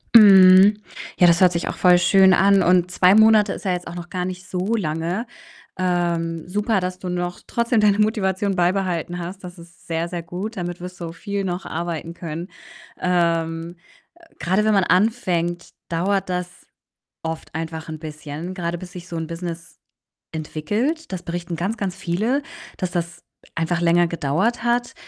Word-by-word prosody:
Mhm. 195 -1 +8 0.4
Ja, 175 - +6
das 170 0 +4
hört 180 -1 +6
sich 170 - -2
auch - - -4
voll 180 -1 +5
schön 190 +2 +5
an 195 0 +4
und 180 0 +3
2 185 +1 +5
Monate 220 -1 +5
ist - - -9
ja 185 - +1
jetzt 180 0 -3
auch 175 - -7
noch 175 0 -8
gar 180 -1 -3
nicht 185 0 -6
so 190 +5 -1
lange. 170 +3 -2 0.5
Ähm, 170 -2 -1
super, 210 0 0
dass 180 0 -4
du 185 - -6
noch 175 0 -3
trotzdem 235 0 +1
deine 210 -1 +4
Motivation 200 -2 +1
beibehalten 175 -1 0
hast. 180 +3 -7
Das 180 0 -9
ist 170 0 -16
sehr, 165 +1 -2
sehr 175 -1 -4
gut. 185 +7 -6
Damit 175 -1 -5
wirst 180 0 -8
du 165 -1 -6
viel 200 +2 -4
noch 180 0 -3
arbeiten 170 0 -4
können. 170 +1 -6 0.5
Ähm, 170 -1 0 0.6
grade 185 +6 +1
wenn 215 0 +3
man 195 -2 +3
anfängt, 180 -4 0 0.2
dauert 185 +3 0
das 180 0 -5 0.6
oft 160 -2 -6
einfach 160 0 -5
'n 155 -1 -7
bisschen, 155 +2 -7
grade 175 -2 -3
bis 180 +1 -10
sich 180 -2 -9
so 170 - -6
'n 160 -1 -4
Business 170 0 -7 0.5
entwickelt. 210 - -3
Das 180 - -4
berichten 170 0 -5
ganz, 195 +8 -2
ganz 195 -3 -3
viele, 210 +10 -1 0.4
dass 185 -2 -2
das 170 -1 -4 0.3
einfach 170 +1 -1
länger 175 0 +3
gedauert 170 +10 -1
hat. 240 +2 0
180 Hz, 170 wpm, -22 LUFS, 170-195 Hz, 0.6 s, Mhm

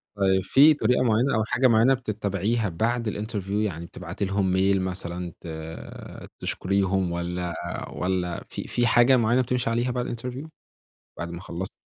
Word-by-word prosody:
طيب، 95 -1 +2
في 145 +8 +6
طريقة 125 -2 +2
معيّنة 120 +2 +2
أو 110 - +2
حاجة 130 +3 +2
معيّنة 115 +3 +5
بتتبعيها 105 -2 -1
بعد 115 +6 0
الinterview 105 -2 -4
يعني 100 -6 -1
بتبعتي 90 +3 -5
لهم 95 -1 0
mail 95 +1 +3
مثلًا 90 -1 -4
ت - - -16
آآ، 80 0 -8
تشكريهم 95 -1 0
والَّا 85 0 -3 0.4
والَّا 90 -2 -2
في - - -6
في 120 -1 +1
حاجة 120 +3 +5
معيّنة 120 +2 +3
بتمشي 125 -1 -1
عليها 120 +2 0
بعد 125 0 -2
الinterview 125 +5 -6 0.7
بعد 85 - -4
ما 85 +1 -7
خلصتِ؟ 95 0 -5
100 Hz, 155 wpm, -25 LUFS, 90-120 Hz, 0.7 s, في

